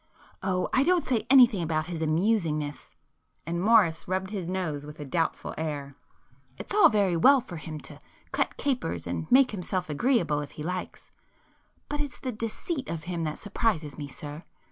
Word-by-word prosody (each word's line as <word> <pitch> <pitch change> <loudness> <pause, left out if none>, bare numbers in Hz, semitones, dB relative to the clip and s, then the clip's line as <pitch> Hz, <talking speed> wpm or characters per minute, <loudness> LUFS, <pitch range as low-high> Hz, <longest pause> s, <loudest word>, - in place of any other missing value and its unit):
"Oh, 185 -1 0
I 260 - +4
don't 350 +3 +3
say 235 -3 0
anything 245 -7 +7
against 155 -1 -1
his 170 -2 -4
amusingness,"—and 160 -1 -2
Morris 195 -6 +4
rubbed 190 +1 -2
his 185 -5 -4
nose 170 -6 -2
with 150 +1 -10
a 145 - -5
doubtful 165 +3 -1
air—"It's 145 - -8
all 420 - +7
very 200 -5 +2
well 270 +12 +6
for 195 -9 -8
him 155 0 -7
to - - -9 0.3
cut - - -1
capers 255 -12 -1
and 155 - -4
make 260 0 +6
himself 180 -3 -3
agreeable 165 - +2
if 145 -1 -6
he 150 - -7
likes,—but 185 - -8
it's 290 -3 -5
the 255 - -4
deceit 240 +6 -4
of 165 -1 -4
him 170 -1 -3
that 155 - -3
surprises 200 -8 -1
me 145 -2 -6
sir. 145 +3 -8
180 Hz, 165 wpm, -27 LUFS, 155-225 Hz, 0.3 s, anything